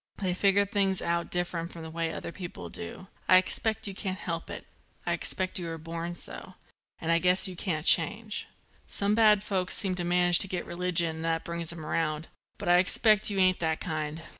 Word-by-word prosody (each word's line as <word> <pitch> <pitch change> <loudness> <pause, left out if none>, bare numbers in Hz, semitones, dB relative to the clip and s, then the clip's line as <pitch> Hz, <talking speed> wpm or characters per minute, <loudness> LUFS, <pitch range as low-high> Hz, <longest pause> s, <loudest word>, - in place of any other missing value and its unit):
They 185 -3 -1
figure 200 +2 +3
things 195 -2 +1
out 170 0 -1
different 175 -1 -2
from 165 - -9
the 160 - -8
way 165 0 -2
other - - -6
people 180 -1 -8
do. 220 -2 -7 0.2
I 185 - +9
expect 220 +4 +1
you 200 - -4
can't 190 -1 -4
help 165 -2 -5
it. - - -7 0.4
I - - 0
expect 185 0 +1
you 175 - -5
were 165 0 -5
born 165 +2 -6
so. - - -8 0.4
And 165 - -2
I 165 - +4
guess 180 +3 +3
you 185 - -7
can't 165 -3 -3
change. 210 0 +3 0.4
Some 200 +1 +2
bad 210 -2 +5
folks 185 -3 +1
seem 195 -3 0
to 180 -1 -3
manage 175 0 +4
to - - +2
get 185 -1 -4
religion 170 -2 -1
and 160 - -5
that 165 0 -1
brings 170 -1 0
'em 165 -2 -8
round; 155 0 -2 0.3
but - - -7
I 175 0 +6
expect 215 +3 +3
you 200 - -3
ain't 185 -1 +3
that 160 -1 -1
kind." 155 -1 -4
180 Hz, 210 wpm, -28 LUFS, 165-195 Hz, 0.4 s, I